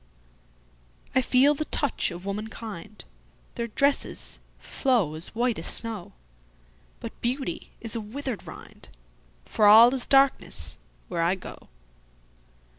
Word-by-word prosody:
I 260 - +4
feel 260 +3 +4
the 305 +1 -3
touch 285 -4 -1
of 175 +1 -8
womankind, 210 -2 -6 0.5
Their 235 -1 -3
dresses 280 +5 -1 0.2
flow 235 - 0
as 160 +6 -6
white 240 -3 +1
as 165 - 0
snow; 225 -5 -1 0.9
But - - -9
beauty 270 +7 -3
is 225 -1 -5
a 230 - -2
withered 245 +2 -5
rindFor - - -3
all 230 +4 +9
is 260 -2 -2
darkness 260 - +2 0.3
where 170 - -2
I 170 +3 +3
go. 185 - -11
225 Hz, 115 wpm, -26 LUFS, 175-260 Hz, 0.9 s, all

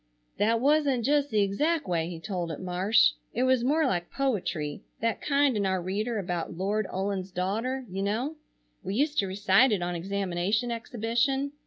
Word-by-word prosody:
"That 225 +2 +3
wasn't 275 -3 +2
just 290 0 +2
the 215 -2 +2
exact 295 +9 0
way 170 -2 0
he 170 -2 -6
told 175 -2 -3
it, 155 - -6
Marsh, 185 +4 +3 0.2
it 245 - +1
was 260 -2 +3
more 300 +5 +2
like 175 -9 -1
poetry, 195 - -2 0.2
that 230 0 -1
kind 280 -3 +2
in 205 - 0
our 190 -1 +1
reader 210 +6 -2
about 175 -3 -3
"Lord 200 +2 0
Ullin's 190 0 -2
daughter"—you 200 +3 -2
know. 230 +10 -1 0.5
We 190 +2 -4
used 290 +4 +1
to 195 - +1
recite 205 +6 +4
it 195 -4 0
on 175 0 -2
examination 195 +5 -1
exhibition. 240 +4 -1
210 Hz, 170 wpm, -28 LUFS, 185-255 Hz, 0.5 s, recite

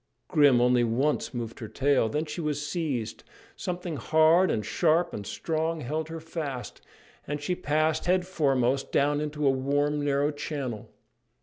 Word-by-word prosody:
Grim 145 -5 +5
only 125 0 +4
once 130 +6 0
moved 115 -3 -5
her 110 - -6
tail. 135 -1 +2
Then 150 +4 -1
she 155 +3 -5
was 150 -1 -2
seized, 145 - -3 0.3
something 175 -3 -4
hard 160 +6 +4
and 105 - -1
sharp 170 +1 +2
and 100 -2 -6
strong 160 0 -2
held 155 +5 -3
her 165 0 -5
fast, 155 -6 -6 0.5
and 145 +1 -3
she 150 +5 -2
passed 155 -1 0
head 180 0 +2
foremost 135 -7 +1
down 145 +1 +2
into 150 0 -3
a 135 - +5
warm, 145 +2 0
narrow 145 +1 +1
channel. 140 -6 -5
150 Hz, 160 wpm, -27 LUFS, 135-160 Hz, 0.5 s, Grim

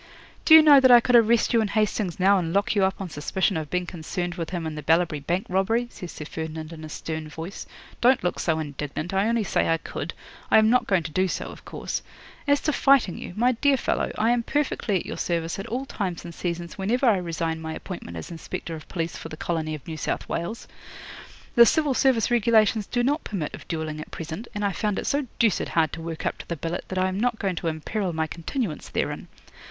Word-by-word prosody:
'"Do 315 - +9
you 320 - +10
know 290 -2 +9
that 260 -1 +5
I 245 -1 +10
could 245 +1 +2
arrest 230 0 +4
you 230 - +5
and 215 - -1
Hastings 210 -4 0
now 195 +1 +5
and 165 -2 -2
lock 200 +1 +2
you 200 -2 +2
up 190 0 +1
on 195 - -4
suspicion 190 +7 0
of 155 -2 -3
being 180 0 -1
concerned 175 +1 -4
with 170 -2 -4
him 175 -3 -3
in 160 - -3
the 150 - -5
Ballabri 165 0 +2
Bank 175 +7 -1
robbery?" 225 +6 +1
says 180 - -8
Sir 150 - -8
Ferdinand 160 0 -6
in 160 -1 -10
a 155 - -7
stern 160 0 -5
voice. 165 +5 -7 0.3
"Don't 250 -1 +4
look 180 - -1
so 160 -2 +1
indignant. 150 +2 -4
I 195 +2 +2
only 230 -1 +1
say 185 - +1
I 165 - +3
could. - - -6 0.3
I - - +6
am 220 0 +5
not 250 - +3
going 190 -4 +2
to 160 - -6
do 185 +5 +2
so, - - -3
of - - -14
course. - - -4 0.5
As 285 0 +4
to 305 - 0
fighting 270 -11 +3
you, - - -7
my 245 +3 +3
dear 270 +3 +2
fellow, - - -1
I 225 +2 +3
am 240 -1 +2
perfectly 265 -5 -1
at 180 - -1
your - - -6
service 170 +1 -1
at 195 - -5
all 255 +4 -3
times 185 -9 -4
and 170 - -7
seasons 170 +1 -4
whenever 235 +7 +1
I 225 -5 +5
resign 165 -2 -2
my 160 0 -5
appointment 130 - -7
as 80 - -7
Inspector 170 0 -6
of 155 - -11
Police 165 -2 -3
for 165 - -8
the 155 - -8
colony 160 -2 -2
of 145 - -11
New 160 -1 -5
South - - -3
Wales. 170 +7 -4 0.9
The 235 - +9
Civil 300 0 +2
Service 255 -3 +2
regulations 220 -2 +3
do 245 -1 0
not 290 +5 +1
permit 175 -8 -4
of - - -10
duelling 155 -2 -3
at - - -9
present, 165 +8 -6
and 205 0 -1
I 200 - +1
found 210 +1 -1
it - - -3
so 285 -1 0
deuced 225 -5 +2
hard 160 -2 +1
to 165 - -5
work 165 -1 -5
up - - -2
to - - -9
the 170 - -2
billet 165 +3 -4
that 185 - -5
I 185 0 +2
am 190 +1 -2
not 240 0 +1
going 195 -4 -1
to 170 - -3
imperil 170 +4 -2
my 160 0 0
continuance 170 - -4
therein. - - -2
185 Hz, 240 wpm, -25 LUFS, 165-225 Hz, 0.9 s, you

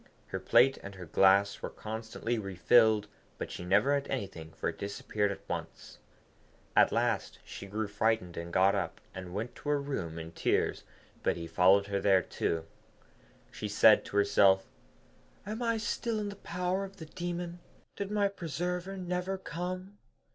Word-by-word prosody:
Her 95 - -3
plate 120 +7 +4
and 95 0 -9
her 90 -2 -8
glass 100 +4 +4
were - - -3
constantly 110 +1 -4
refilled, 105 +3 +4 0.3
but - - -5
she - - -6
never 100 +10 +3
had 140 -1 0
anything, 95 -10 -5
for - - -2
it - - -8
disappeared 100 +1 -1
at 100 - -9
once. - - -6 0.8
At - - +6
last - - 0
she 100 - -8
grew 105 +2 -2
frightened, 105 -3 0 0.2
got 95 +3 +4
up, 85 -5 -2
and 90 -1 -7
went 110 +6 -4
to 145 - -5
her 145 -1 +3
room 100 - -4
in 80 0 -6
tears, - - 0 0.4
but - - +1
he 85 - -5
followed 95 +4 +4
her 100 -1 -1
there 95 -2 +4
too. 80 -1 -2 0.9
She - - -5
said - - +6
to 100 - -4
herself, 95 -1 +5 0.8
'Am 215 +4 -4
I 230 -1 +1
still 225 +1 -2
in 210 -1 -2
the 200 - -7
power 180 0 -2
of 195 0 -8
the 160 - -8
demon? 175 +1 -5 0.4
Did 200 -1 -4
my 205 -1 +2
preserver 180 +1 -3
never 180 +1 -2
come?' 185 +3 -5
110 Hz, 165 wpm, -31 LUFS, -, 0.9 s, At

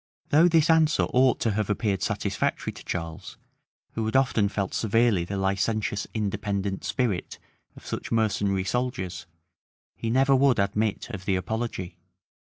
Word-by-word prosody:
[] - - -44
Though 160 +4 +6
this 165 -2 +4
answer 160 -2 +4
ought 130 +1 +4
to 115 - +2
have 105 0 -1
appeared 105 -3 0
satisfactory - - -1
to - - -12
Charles, 85 +2 -5 0.5
who 115 - -3
had 110 - -3
often 120 -6 +3
felt 100 -2 -3
severely 110 -4 +2
the 100 +2 -4
licentious 100 +2 -1
independent 100 -2 -2
spirit 115 -9 -2 0.4
of - - -14
such - - -5
mercenary 100 -4 +1
soldiers, 95 -6 -3 0.7
he 115 - -4
never 135 +3 +4
would 135 -1 +4
admit 105 +3 -1
of 95 -4 -7
the 95 - +1
apology. 95 -2 -3
105 Hz, 150 wpm, -26 LUFS, 95-120 Hz, 0.7 s, Though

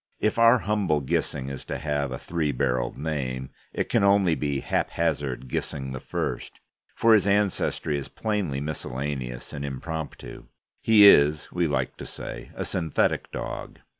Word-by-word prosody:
If 110 +1 +1
our 115 +2 +7
humble 100 -8 +1
Gissing 65 0 -1
is 70 - -6
to - - -3
have 70 0 -1
a 65 - -3
three 80 -1 -1
barrelled 60 -1 -1
name, 65 -4 -3 0.2
it - - -2
can - - +2
only 100 -3 +4
be 70 -3 -1
Haphazard 70 -6 -1
Gissing 65 +1 -3
I, - - -4 1.0
for 115 0 +5
his 105 -2 +4
ancestry 100 -7 +1
is 70 - -7
plainly 100 -11 -2
miscellaneous 65 -4 -4
and 70 - -5
impromptu. 80 +3 -6 0.4
He 110 -2 +7
is, 75 -5 +6
we 90 -1 +1
like 75 - -1
to - - -7
say, - - -7
a - - -3
synthetic 80 -4 0
dog. - - -6
75 Hz, 150 wpm, -26 LUFS, 70-95 Hz, 1.0 s, our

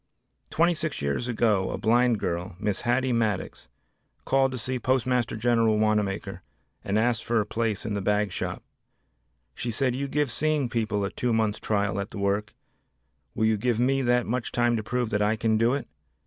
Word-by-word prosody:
Twenty 170 +2 +3
six 155 -2 -3
years 70 - -1
ago 110 -5 +1
a - - -3
blind 120 +1 +3
girl, 90 +1 -3
Miss 105 -2 -1
Hattie 125 +1 +1
Maddox, 110 - -1 0.6
called 135 0 +2
to 130 - -4
see 125 +2 -3
Postmaster 125 -2 +1
General 115 -1 +2
Wanamaker 100 -3 0 0.4
and 100 +2 0
asked 115 0 +1
for 115 -1 +1
a 105 - 0
place 110 -1 -2
in 110 - -2
the 100 - -2
bag 105 0 +1
shop. - - -4 0.9
She 120 - -4
said, 125 +2 0
"You 140 +2 -2
give 145 -1 0
seeing 150 -2 0
people 110 -4 -1
a 100 - -3
two 125 -1 -1
months' 110 -2 +1
trial 100 -1 0
at 100 - -4
the - - -9
work, 100 +1 -1 0.8
will 110 - +1
you 110 -1 +3
give 120 +1 0
me 135 +2 +2
that 125 -1 +2
much 125 +1 -2
time 120 0 +2
to 110 - -1
prove 120 +1 -2
that 105 - +1
I 105 +1 +2
can 110 0 +1
do 120 +3 +3
it?" 140 - -5
115 Hz, 190 wpm, -26 LUFS, 105-125 Hz, 0.9 s, Twenty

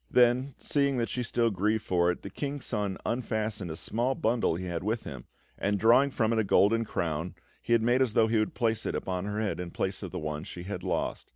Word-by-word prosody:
Then, 125 +2 +3
seeing 140 -2 +1
that 115 -3 0
she 125 - -2
still 120 -1 +1
grieved 105 +3 0
for 85 -1 +2
it, 90 - -2
the 100 - -7
King's 145 +4 -4
Son 105 -4 -2
unfastened 110 -5 -2
a 80 - -4
small 120 +9 0
bundle 115 -7 +1
he 90 +2 -4
had 85 -1 -3
with 110 +3 -1
him, 65 -4 -8 0.3
and 100 +1 +1
drawing 120 +7 +5
from 115 -4 +1
it 115 - +2
a - - +3
golden 110 +3 +3
crown, 80 -3 -2 0.3
he 120 0 +3
made 120 +3 +2
as 125 -5 +2
though 110 - +5
he 110 0 +2
would 110 - -1
place 115 -2 0
it - - -2
upon 90 0 -2
her 105 +1 -2
head 110 -4 -1
in 90 -1 -4
place 95 +3 -3
of - - -5
the 95 - -6
one 75 -2 -4
she 90 - -8
had 90 -1 -5
lost. 90 -1 -2
110 Hz, 240 wpm, -29 LUFS, 90-120 Hz, 0.3 s, drawing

